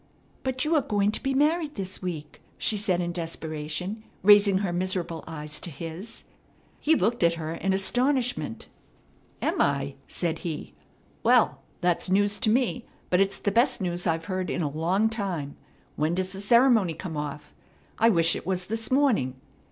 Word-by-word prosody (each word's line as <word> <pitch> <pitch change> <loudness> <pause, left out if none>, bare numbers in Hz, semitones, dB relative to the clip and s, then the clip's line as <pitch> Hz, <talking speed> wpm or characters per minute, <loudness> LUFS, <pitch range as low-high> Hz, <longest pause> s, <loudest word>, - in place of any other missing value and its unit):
"But 260 0 -2
you 315 - +1
are 305 - +4
going 205 -5 +1
to - - -3
be 270 0 -1
married 305 +2 +2
this 195 -1 -5
week," 160 -5 -6 0.2
she 220 - 0
said 190 -4 0
in 175 0 -2
desperation, 165 +4 -4 0.2
raising 205 -1 +7
her 175 - -2
miserable 175 -2 -2
eyes 150 -1 -4
to - - -5
his. 165 +8 -7 0.6
He 320 +2 +3
looked 230 - +1
at 170 0 +4
her 160 -1 -4
in 195 +3 -1
astonishment. 245 - 0 0.8
"Am - - +1
I?" 140 -1 +1
said 170 -3 -2
he. 160 -3 -5 0.5
"Well, - - +4 0.2
that's 175 0 +1
news 205 +2 +2
to 235 - +1
me; 245 +1 +1 0.2
but 180 +1 +4
it's 195 0 +1
the 200 - -1
best 235 +6 +3
news 175 -2 -2
I've 165 0 0
heard 185 0 -2
in 175 - -1
a 150 - 0
long 175 +8 +1
time. 190 -10 -3 0.4
When 155 +3 +1
does 185 0 -2
the 195 - -6
ceremony 225 -5 +4
come 165 0 -6
off? 150 0 -5 0.5
I 230 - +6
wish 165 -5 +3
it - - -5
was 185 -1 0
this 225 +3 -3
morning. 250 - +2
185 Hz, 175 wpm, -27 LUFS, 165-220 Hz, 0.8 s, raising